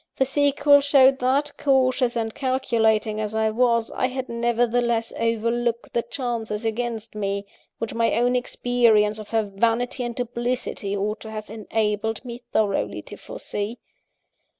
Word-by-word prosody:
The 265 - +2
sequel 285 +1 +4
showed 270 -1 +5
that, 270 +4 +1
cautious 255 -2 +2
and 225 -1 -2
calculating 225 -5 +1
as 215 0 -3
I 220 0 +2
was, 230 0 +2
I 255 - 0
had 260 0 -5
nevertheless 235 0 +1
overlooked 230 +1 -1
the 235 - +2
chances 235 -3 -4
against 225 0 -3
me, 200 -1 -2 0.3
which 230 - -4
my 230 0 +1
own 245 +2 +2
experience 235 -4 +2
of 215 - -9
her 225 -1 +1
vanity 230 +5 0
and 240 -1 -4
duplicity 240 -4 -2
ought 210 +2 -2
to 220 - -9
have 215 -1 -7
enabled 220 +1 -2
me 240 -1 -6
thoroughly 205 -3 0
to - - -10
foresee. 210 +4 -5
235 Hz, 145 wpm, -24 LUFS, 220-250 Hz, 0.3 s, showed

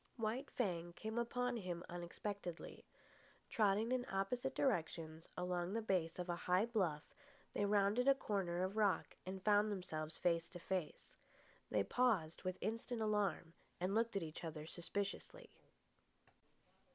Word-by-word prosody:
White 235 +5 -1
Fang 175 -7 -1
came 220 +5 -3
upon 245 +1 0
him 180 -4 -3
unexpectedly. 175 +1 -5 0.7
Trotting 215 +2 +3
in 255 -1 +2
opposite 245 +7 0
directions 165 - 0
along 180 +1 -1
the 225 - +1
base 180 -6 +1
of 180 0 -3
a 175 - 0
high 185 +4 +5
bluff, 185 -10 +1 0.5
they 205 - +2
rounded 205 +5 +3
a 275 - +8
corner 185 -8 0
of 190 +3 -2
rock 205 -3 +2
and 190 0 -4
found 210 0 +5
themselves 160 -5 -2
face 170 -1 +2
to 175 - -8
face. 180 -2 -3 0.5
They - - +3
paused 210 -11 +2
with 185 -1 -2
instant 230 +3 -2
alarm, 200 -6 +1 0.3
and 185 +2 0
looked 230 0 +2
at 195 - +1
each 155 +2 -6
other 155 -2 -4
suspiciously. 200 - -4
195 Hz, 140 wpm, -40 LUFS, 175-220 Hz, 0.7 s, a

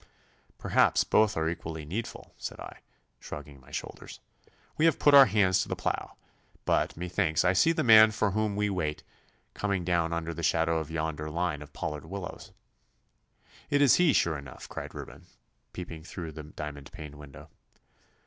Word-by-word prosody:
'Perhaps - - +3
both 110 -4 +3
are 80 0 0
equally 80 -2 -5
needful,' 105 +9 -6
said - - -7
I, - - -9 0.4
shrugging 75 -1 -9
my 65 - -19
shoulders. - - -7 0.6
'We 155 - +2
have 165 -4 +4
put 145 - +4
our 140 -2 +10
hands 95 -3 +3
to - - -5
the - - -1
plough. - - -3 0.5
But - - +1
methinks 90 -2 0
I 90 - +4
see 130 - +4
the 165 - 0
man 110 -2 +8
for 105 -1 0
whom 105 0 -1
we 105 0 +1
wait 85 -7 -2 0.5
coming 100 -4 -2
down 85 -2 +1
under 85 0 -3
the 85 - -6
shadow 80 0 +2
of 80 - -6
yonder 80 -1 -3
line 85 -2 -2
of 75 0 -11
pollard 75 +1 -5
willows.' 95 +1 -7 1.2
'It 145 - +2
is 145 -2 +6
he, 175 -3 +5
sure 80 - +1
enough,' 70 -3 -11
cried - - -7
Reuben, - - -10 0.4
peeping 85 -3 -7
through 85 -1 -7
the 75 0 -8
diamond 75 -2 -8
paned 75 -2 -9
window. 75 -2 -13
85 Hz, 170 wpm, -29 LUFS, 75-100 Hz, 1.2 s, our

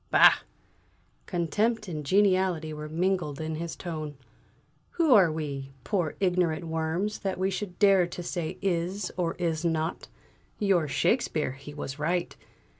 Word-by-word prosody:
"Bah!" - - +8 0.9
Contempt 210 +6 0
and 155 -4 -4
geniality 185 -2 +2
were 150 0 -6
mingled 175 -3 0
in 160 0 -3
his 170 0 -4
tone. 155 -5 -5 0.8
"Who 325 -6 +4
are 190 -7 +6
we, 140 -3 -5
poor 180 -7 -1
ignorant 175 -4 +1
worms, 165 +6 -1
that 190 -2 -2
we 190 +1 0
should 190 -2 -4
dare 195 -3 +5
to 175 0 -7
say 170 -2 -3
'is' 180 +1 -1
or 170 -2 -1
'is 170 -2 -1
not'? 165 -1 -1 0.5
Your 190 -6 +2
Shakespeare, 155 - +1
he 140 +2 -10
was 145 -1 -6
right! 175 +3 -1
170 Hz, 140 wpm, -28 LUFS, 155-190 Hz, 0.9 s, Bah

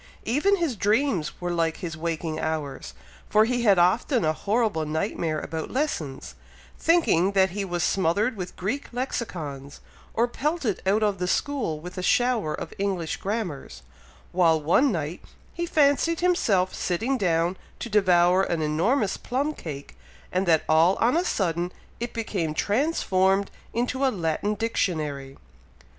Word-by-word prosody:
Even 300 - +3
his 335 -9 -1
dreams 210 - 0
were 175 0 -2
like 165 -2 0
his 170 -5 -5
waking 160 -1 -3
hours, 155 -4 -4 0.3
for 215 +1 +5
he 245 +1 0
had 205 -5 +5
often 195 - +3
a 155 - +2
horrible 210 -2 0
night 160 +7 -2
mare 155 -2 -1
about 160 +1 -5
lessons, 155 - -3 0.5
thinking 200 - +3
that 190 -1 +3
he 200 +2 -3
was 175 -2 -2
smothered 195 +6 +1
with 180 -3 -6
Greek 220 +10 -3
Lexicons, 165 - -5 0.4
or 235 +2 +3
pelted 275 - -2
out 210 +3 +3
of 205 -3 +1
the 180 - -1
school 230 - -1
with 180 +3 -8
a - - -2
shower 235 -3 +2
of 165 - -7
English 190 -5 -1
Grammars, 190 - -4 0.5
while 165 -3 +3
one 175 - +3
night, 160 -1 -3 0.3
he 345 0 -3
fancied 310 +2 +3
himself 210 - +2
sitting 225 +10 -1
down 175 -5 +1 0.2
to - - -5
devour 185 -3 +4
an 170 -4 -1
enormous 190 - +1
plum 280 +5 -2
cake, 145 - -8 0.4
and 185 +1 0
that 160 -2 +4
all 165 +4 +5
on 240 +5 +2
a 345 - +2
sudden 175 - -1 0.3
it 240 0 -3
became 185 -9 -2
transformed 200 - +1 0.2
into 250 +3 -1
a 270 - +4
Latin 190 +1 -1
Dictionary! 155 -11 -2
190 Hz, 150 wpm, -25 LUFS, 165-240 Hz, 0.5 s, for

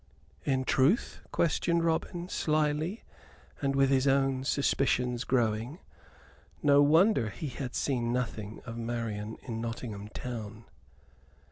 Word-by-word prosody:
"In 130 -2 +1
truth?" 140 - +2
questioned 170 +1 +1
Robin, 170 +2 -1
slily, 155 +4 0 0.6
and 140 -1 0
with 135 0 +3
his 135 0 +3
own 135 -1 +2
suspicions 125 -3 +1
growing. 120 +3 0 0.9
No 145 -1 +6
wonder 155 - +4
he 155 +6 -5
had 125 -1 -6
seen 120 -4 0
nothing 115 -4 -3
of 115 -1 -6
Marian 115 -2 -3
in 115 -3 -4
Nottingham 115 -3 -5
town. 110 -1 -7
130 Hz, 115 wpm, -30 LUFS, 115-145 Hz, 0.9 s, No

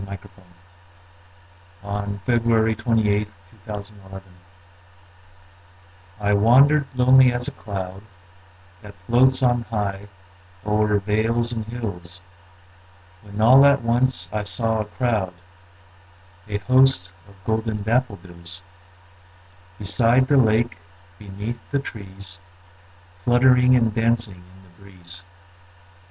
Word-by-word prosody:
William 100 0 -4
Wordsworth 120 +1 0
I 115 -1 +4
Wandered - - +1
Lonely 110 - -12 0.4
As 105 +1 -10
a - - -5
Cloud 95 -2 -12 2.0
I 105 0 +2
WANDERED 135 +8 +4
lonely 130 0 +5
as 120 0 -3
a - - -3
cloud 95 -1 -7 0.8
That 105 -2 -13
floats 130 +4 +3
on 120 -1 +2
high 105 -3 -4 0.6
o'er 105 0 +1
vales 110 +4 -1
and 110 -2 -4
hills, 95 -7 -7 1.0
When 105 0 -10
all 130 +5 +7
at 140 -2 +4
once 115 -6 0
I 105 -1 -2
saw 110 +2 -1
a 105 - -2
crowd, 105 -5 -2 1.1
A 105 -1 -2
host, 130 -5 +2 0.2
of 100 - -18
golden 110 0 -2
daffodils; 95 -7 -3 1.1
Beside 115 +5 +2
the 145 - +3
lake, 115 -1 +2 0.4
beneath 105 +3 -6
the 140 - 0
trees, 100 -7 -8 0.8
Fluttering 125 +1 +4
and 115 -3 +2
dancing 115 -5 -1
in 95 - -19
the 90 0 -23
breeze. 90 -2 -10
110 Hz, 110 wpm, -22 LUFS, 100-120 Hz, 2.0 s, all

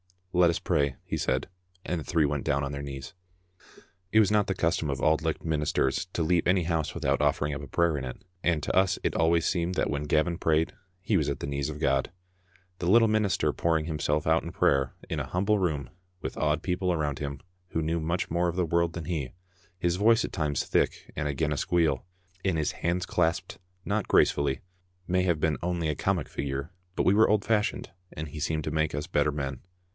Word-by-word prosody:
"Let 90 -1 +5
us 85 - 0
pray," 70 -2 +1
he - - -2
said, - - 0 0.4
and 90 - -1
the - - -7
three 80 -3 +2
went 70 -1 -2
down 70 0 +1
on 70 - -3
their 70 0 -4
knees. 70 -1 -7 1.0
It 110 - +7
was 105 - +2
not 105 -1 +3
the 95 - -1
custom 80 -2 0
of 70 -2 -2
Auld 80 0 +3
Licht 80 0 -2
ministers 75 -2 0
to 85 - 0
leave 85 +1 +2
any 90 0 +3
house 80 -2 -1
without - - +1
ofiEering 75 0 +1
up 75 - -5
a 70 - -8
prayer 85 +1 +1
in 65 - -3
it, 65 - -8 0.2
and 85 -5 +1
to - - -1
us 95 0 +3
it - - +1
always 80 0 +2
seemed 90 0 0
that - - +1
when 70 0 -2
Gavin 80 +3 +1
prayed, 80 0 +2 0.3
he 100 +1 +1
was 75 -4 +1
at 70 - -3
the - - -3
knees 70 +1 -2
of 75 -1 -6
God. 70 -3 +1 0.7
The 85 - -1
little 115 +2 +6
minister 105 -3 +2
pouring 80 -2 +1
him 80 -2 -3
self 75 +1 0
out 80 +1 +3
in 85 - -7
prayer 70 -2 +2
in - - -2
a - - -2
humble 100 +4 +1
room, 75 -8 -1 0.3
with - - -5
awed 75 0 +1
people 90 0 0
around 75 -4 -1
him 70 -2 -5 0.3
who 80 - -2
knew 80 +2 0
much 85 +2 -2
more 85 +1 +2
of 85 - -2
the 90 -1 +1
world 85 0 +1
than 85 -2 -5
he, 75 -6 -3 0.4
his 85 -1 0
voice 115 +3 +4
at - - -4
times 75 -3 -1
thick - - 0
and 75 -1 -1
again 75 +2 -1
a 75 - -1
squeal, 85 +2 +1 0.4
and 95 -4 +2
his 75 -1 0
hands 90 +2 -1
clasped 90 +1 0 0.3
not 100 0 -1
gracefully, 70 -2 +3 0.5
may 90 0 +2
have 85 -5 +1
been 80 -2 +1
only 85 -2 -1
a - - +1
comic - - -1
figure, 70 +3 -4 0.2
but - - +1
we 95 - +5
were 110 +2 +5
old 105 -1 +3
fashioned, 105 -2 0 0.2
and 75 0 -5
he 75 - -7
seemed 80 0 -1
to 75 - -3
make 80 -1 0
us 75 0 -3
better 75 -3 +1
men. 70 -3 -4
80 Hz, 225 wpm, -28 LUFS, 75-90 Hz, 1.0 s, It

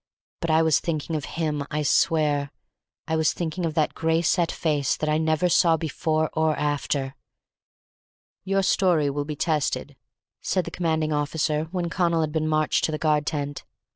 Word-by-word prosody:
But 170 - -3
I 160 +1 +4
was 160 -2 +3
thinking 160 -1 -3
of 150 - -3
him, 150 -3 -1
I 150 0 -1
swear. 150 -3 +2 0.6
I 160 - 0
was 160 -1 +2
thinking 170 0 -2
of 160 - -5
that 155 -2 +1
gray 160 +1 0
set 170 0 +2
face 145 -4 0
that 155 - -2
I 155 0 +2
never 160 +2 +1
saw 170 -1 +4
before 155 0 -1
or 160 -1 +1
after. 140 -2 -1 1.3
"Your 195 0 +1
story 170 -7 +2
will 145 +1 -3
be 150 0 -5
tested," 145 -3 -1 0.5
said 185 -3 0
the - - -6
commanding 160 -3 0
officer, 150 +1 0
when 175 +1 -3
Connal 170 -2 +1
had 155 -1 -1
been 155 0 -1
marched 155 -1 +1
to - - -2
the 155 - -2
guard 150 -1 +1
tent. 145 -2 -3
155 Hz, 175 wpm, -25 LUFS, 150-165 Hz, 1.3 s, I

